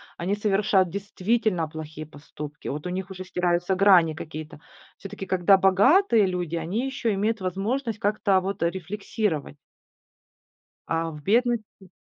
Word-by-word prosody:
они 190 Hz, +4 st, -1 dB
совершают 200 Hz, -2 st, +2 dB
действительно 200 Hz, -1 st, -1 dB
плохие 155 Hz, 0 st, -8 dB
поступки. 145 Hz, 0 st, -10 dB
Вот 150 Hz, +4 st, -4 dB
у -, -, -2 dB
них 190 Hz, +1 st, -4 dB
уже 185 Hz, -1 st, -7 dB
стираются 175 Hz, 0 st, 0 dB
грани 180 Hz, -4 st, +5 dB
какие-то. 155 Hz, -1 st, -8 dB, 0.4 s
Всё-таки, 195 Hz, 0 st, -8 dB
когда 190 Hz, +1 st, +4 dB
богатые 215 Hz, -, +4 dB
люди, 180 Hz, -3 st, -3 dB
они 180 Hz, +10 st, -2 dB
еще 265 Hz, -5 st, -1 dB
имеют 215 Hz, +2 st, -1 dB
возможность 215 Hz, +6 st, -2 dB
как-то 205 Hz, -2 st, +2 dB
вот 195 Hz, -1 st, -4 dB
рефлексировать 180 Hz, -2 st, -2 dB, 1.3 s
а 165 Hz, 0 st, -1 dB
в 150 Hz, -1 st, -10 dB
бедности 220 Hz, -3 st, 0 dB
190 Hz, 130 wpm, -25 LUFS, 170-210 Hz, 1.3 s, грани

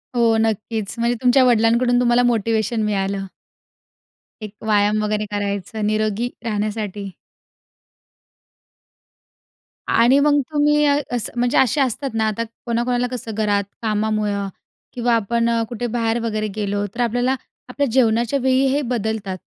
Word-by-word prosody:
हो 230 Hz, -1 st, +3 dB
नक्कीच, 220 Hz, -1 st, -1 dB
म्हणजे 235 Hz, +1 st, +1 dB
तुमच्या 255 Hz, +1 st, +5 dB
वडिलांकडून 240 Hz, +1 st, +3 dB
तुम्हाला 245 Hz, 0 st, +3 dB
मोटिव्हेशन 225 Hz, -1 st, +1 dB
मिळालं. 195 Hz, -1 st, -1 dB, 1.2 s
एक 210 Hz, -, -10 dB
व्यायाम 210 Hz, 0 st, +2 dB
वगैरे 210 Hz, 0 st, -1 dB
करायचं 205 Hz, +1 st, -3 dB
निरोगी 215 Hz, +2 st, 0 dB, 0.2 s
राहण्यासाठी. 210 Hz, -2 st, -3 dB, 2.8 s
आणि 245 Hz, +4 st, +4 dB
मग 290 Hz, 0 st, +4 dB
तुम्ही 295 Hz, 0 st, +3 dB
अ, 285 Hz, 0 st, +3 dB
असं 240 Hz, 0 st, -3 dB
म्हणजे 245 Hz, 0 st, +1 dB
असे 265 Hz, +3 st, +3 dB
असतात 270 Hz, +2 st, -1 dB
ना, 220 Hz, -1 st, +1 dB
आता 215 Hz, +2 st, -1 dB, 0.2 s
कोणाकोणाला 240 Hz, +1 st, 0 dB
कसं 235 Hz, -2 st, -5 dB
घरात 205 Hz, -2 st, +1 dB, 0.2 s
कामामुळं 210 Hz, -2 st, -1 dB, 0.5 s
किंवा 240 Hz, -1 st, 0 dB
आपण 230 Hz, +2 st, 0 dB, 0.2 s
कुठे 240 Hz, 0 st, -3 dB
बाहेर 230 Hz, 0 st, 0 dB
वगैरे 215 Hz, -1 st, -1 dB
गेलो. 205 Hz, -1 st, -1 dB
तर 245 Hz, -, -2 dB
आपल्याला 245 Hz, +3 st, +1 dB, 0.3 s
आपल्या 285 Hz, +2 st, -1 dB
जेवणाच्या 240 Hz, +1 st, +2 dB
वेळी 260 Hz, +1 st, +2 dB
हे 290 Hz, -, +1 dB
बदलतात. 220 Hz, -6 st, -3 dB
230 Hz, 125 wpm, -20 LUFS, 210-245 Hz, 2.8 s, तुमच्या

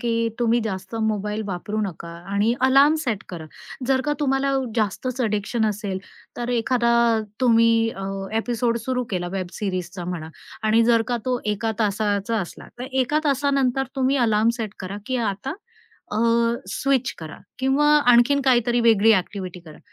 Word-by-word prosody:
की 230 Hz, -1 st, 0 dB
तुम्ही 235 Hz, 0 st, +2 dB
जास्त 195 Hz, -1 st, -5 dB
मोबाईल 210 Hz, 0 st, -2 dB
वापरू 205 Hz, +3 st, -3 dB
नका 170 Hz, -2 st, -8 dB, 0.2 s
आणि 205 Hz, +3 st, +2 dB
अलार्म 275 Hz, +3 st, +6 dB
सेट 225 Hz, -6 st, -2 dB
करा. 165 Hz, -3 st, -7 dB, 0.4 s
जर 265 Hz, 0 st, +2 dB
का -, -, +2 dB
तुम्हाला 275 Hz, -1 st, +1 dB, 0.2 s
जास्तच 235 Hz, +4 st, -1 dB
ॲडिक्शन 220 Hz, 0 st, 0 dB
असेल 205 Hz, -2 st, -3 dB, 0.4 s
तर 240 Hz, 0 st, -4 dB
एखादा 235 Hz, 0 st, +1 dB, 0.5 s
तुम्ही 230 Hz, -2 st, +5 dB, 0.2 s
अ, 195 Hz, -, -5 dB, 0.3 s
ॲपिसोड 235 Hz, +1 st, 0 dB
सुरु 250 Hz, -1 st, -1 dB
केला 180 Hz, -3 st, -2 dB
वेब 190 Hz, -2 st, -2 dB
सीरीजचा 185 Hz, -2 st, -4 dB
म्हणा, 170 Hz, -3 st, -5 dB, 0.3 s
आणि 220 Hz, +1 st, +4 dB
जर 230 Hz, -1 st, +4 dB
का 245 Hz, -, 0 dB
तो 255 Hz, -1 st, 0 dB, 0.2 s
एका 220 Hz, +2 st, -2 dB
तासाचा 205 Hz, +1 st, 0 dB
असला. 175 Hz, -, -8 dB
तर 245 Hz, -, -4 dB, 0.2 s
एका 295 Hz, +5 st, 0 dB
तासानंतर 275 Hz, -2 st, +1 dB
तुम्ही 265 Hz, +1 st, +2 dB
अलार्म 220 Hz, -3 st, +3 dB
सेट 220 Hz, -4 st, -5 dB
करा, 190 Hz, +1 st, -6 dB
की 260 Hz, -, -1 dB
आता 200 Hz, +7 st, -5 dB, 0.6 s
अ, -, -, -1 dB, 0.5 s
स्विच 265 Hz, +5 st, 0 dB
करा. 160 Hz, -2 st, -9 dB, 0.2 s
किंवा 265 Hz, +3 st, +2 dB, 0.3 s
आणखीन 240 Hz, +4 st, +4 dB
काहीतरी 240 Hz, -2 st, +3 dB
वेगळी 225 Hz, -1 st, +5 dB
ॲक्टिव्हिटी 185 Hz, -2 st, -2 dB
करा. 155 Hz, -3 st, -14 dB
225 Hz, 155 wpm, -23 LUFS, 200-250 Hz, 0.6 s, अलार्म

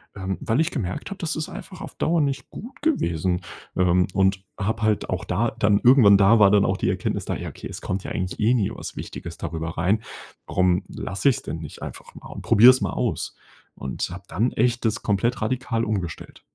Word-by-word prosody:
Ähm, 95 Hz, -1 st, -3 dB
weil 125 Hz, -2 st, 0 dB
ich 160 Hz, +1 st, +1 dB
gemerkt 90 Hz, -, -4 dB
habe, 200 Hz, -, -6 dB
das 165 Hz, -3 st, -2 dB
ist 155 Hz, 0 st, -3 dB
einfach 185 Hz, -4 st, -9 dB
auf -, -, -8 dB
Dauer 165 Hz, 0 st, +1 dB
nicht 135 Hz, -2 st, -2 dB
gut 240 Hz, +7 st, -10 dB
gewesen. 90 Hz, -, 0 dB, 0.4 s
Ähm, 90 Hz, 0 st, +3 dB
und 95 Hz, 0 st, +2 dB
habe 110 Hz, +3 st, -2 dB
halt 110 Hz, -1 st, +1 dB
auch -, -, -2 dB
da 110 Hz, +6 st, 0 dB
dann 105 Hz, -2 st, +2 dB
irgendwann 120 Hz, -6 st, +7 dB
da 100 Hz, +3 st, +5 dB
war 100 Hz, -2 st, +7 dB
dann 105 Hz, -1 st, +4 dB
auch 95 Hz, -, 0 dB
die -, -, 0 dB
Erkenntnis -, -, -2 dB
da, -, -, -2 dB
ja: -, -, -5 dB
„Okay, -, -, -9 dB
es -, -, -8 dB
kommt 95 Hz, +1 st, -3 dB
ja -, -, -6 dB
eigentlich 90 Hz, 0 st, -3 dB
eh 110 Hz, +3 st, +3 dB
nie 110 Hz, -6 st, +1 dB
was -, -, -8 dB
Wichtiges 85 Hz, 0 st, -7 dB
darüber 80 Hz, 0 st, -5 dB
rein. 95 Hz, +6 st, +2 dB, 0.5 s
Warum 90 Hz, 0 st, +2 dB
lasse 95 Hz, +9 st, -1 dB
ich's 130 Hz, -, 0 dB
denn 80 Hz, -, -5 dB
nicht 80 Hz, -2 st, -9 dB
einfach -, -, -9 dB
mal -, -, -11 dB
und -, -, -8 dB
probiere 120 Hz, +5 st, +8 dB
es 130 Hz, -3 st, -1 dB
mal 100 Hz, -, -1 dB
aus“ -, -, -2 dB, 0.4 s
und 65 Hz, -, -4 dB
habe 90 Hz, +2 st, -8 dB
dann 120 Hz, +4 st, 0 dB
echt 120 Hz, +1 st, +1 dB
das 110 Hz, 0 st, 0 dB
komplett 110 Hz, +4 st, 0 dB
radikal 115 Hz, 0 st, -1 dB
umgestellt. 95 Hz, -7 st, -4 dB
105 Hz, 220 wpm, -24 LUFS, 90-125 Hz, 0.5 s, probiere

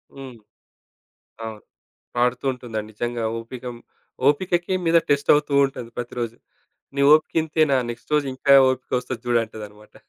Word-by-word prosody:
హ్మ్. 135 Hz, -3 st, -9 dB, 1.1 s
అవును. 110 Hz, -2 st, -7 dB, 0.6 s
పాడుతూ 125 Hz, +1 st, +1 dB
ఉంటుందండి. 110 Hz, -4 st, -6 dB
నిజంగా 120 Hz, +1 st, -3 dB
ఓపికం 120 Hz, +1 st, -7 dB, 0.5 s
ఓపికకి 175 Hz, +4 st, +1 dB
మీద 165 Hz, 0 st, +3 dB
టెస్ట్ 140 Hz, 0 st, +2 dB
అవుతూ 145 Hz, 0 st, 0 dB
ఉంటది 125 Hz, -3 st, -8 dB
ప్రతిరోజు. 120 Hz, -1 st, -4 dB, 0.6 s
నీ 140 Hz, -, -1 dB
ఓపిక 155 Hz, 0 st, +3 dB
ఇంతేనా 155 Hz, -3 st, +2 dB
నెక్స్ట్ 120 Hz, +5 st, -9 dB
రోజు 150 Hz, -1 st, +2 dB
ఇంకా 140 Hz, +1 st, +4 dB, 0.2 s
ఓపికొస్తది 130 Hz, -1 st, -3 dB
జూడు 120 Hz, -1 st, +3 dB
అంటదన్నమాట. 105 Hz, -1 st, -12 dB
125 Hz, 125 wpm, -23 LUFS, 115-145 Hz, 1.1 s, ఇంకా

